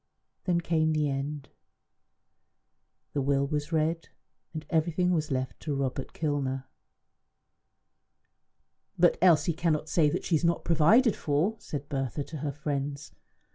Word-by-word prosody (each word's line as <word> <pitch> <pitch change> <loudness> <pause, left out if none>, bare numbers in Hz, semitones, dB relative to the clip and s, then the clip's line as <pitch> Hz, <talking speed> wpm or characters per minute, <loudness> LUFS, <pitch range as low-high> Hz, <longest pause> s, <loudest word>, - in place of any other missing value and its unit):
Then 175 -2 +2
came 160 -2 +1
the 155 -1 +1
end. 140 +1 -4 1.6
The 140 - 0
will 140 0 +2
was 150 +2 -3
read, 165 +1 0 0.4
and 155 -1 -6
everything 170 +3 +1
was 155 -3 0
left 130 -2 -3
to 150 -3 -3
Robert 135 -1 -3
Kilner. 135 -4 -2 2.3
"But 175 0 +4
Elsie 175 -1 +5
cannot 155 -1 0
say 155 -4 +3
that - - -2
she 170 - +2
is 155 - 0
not 170 0 +1
provided 190 - +4
for," 155 +9 0
said 145 -1 -6
Bertha 135 -1 -2
to 155 - -8
her 145 0 -3
friends. 145 0 -4
150 Hz, 135 wpm, -28 LUFS, 140-165 Hz, 2.3 s, Elsie